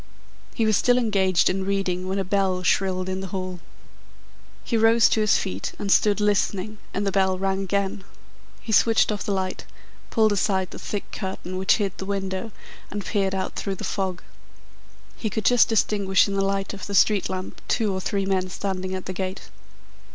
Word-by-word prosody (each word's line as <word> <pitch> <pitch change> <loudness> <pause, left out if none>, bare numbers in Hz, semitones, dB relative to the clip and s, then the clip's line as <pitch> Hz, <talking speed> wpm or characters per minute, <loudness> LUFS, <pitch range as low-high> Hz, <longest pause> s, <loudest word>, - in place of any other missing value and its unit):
He 225 - +1
was 215 -1 +3
still 245 0 +3
engaged 195 -6 +2
in 190 +1 0
reading 190 -2 -1
when 190 - -1
a 195 - 0
bell 190 -1 0
shrilled 185 0 +1
in 190 0 -2
the 190 - -5
hall. 185 -1 -5 1.0
He 235 - -2
rose 225 +1 +5
to 220 - +2
his 215 -1 +4
feet 95 +2 -4
and 200 - -2
stood 210 +1 +4
listening 210 0 0
and 205 - -2
the 195 - +1
bell 190 -1 +2
rang 195 +1 -1
again. 195 0 -1 0.6
He 225 - -5
switched 225 +1 +4
off 210 - -3
the - - -2
light, 190 -1 -2 0.5
pulled 220 -2 +3
aside 190 -2 0
the - - -8
thick 205 - -5
curtain 190 -2 -5
which 190 +1 +3
hid 200 -3 -2
the 190 - -4
window, 195 +2 -3 0.4
and 205 -1 -5
peered 195 -2 0
out 190 - -3
through 195 -1 -3
the - - -8
fog. 190 -2 -2 0.9
He 220 - -2
could 210 0 -3
just 245 0 +5
distinguish 200 -4 +2
in 200 - -3
the 195 - +1
light 195 0 -1
of 200 - -7
the 200 - -3
street 205 +1 +4
lamp 185 0 -5
two 215 -4 +1
or 190 - -3
three 195 +1 -1
men 190 -1 0
standing 190 0 -3
at 185 - -6
the 185 - -4
gate. 190 +1 -5
195 Hz, 195 wpm, -24 LUFS, 185-205 Hz, 1.0 s, rose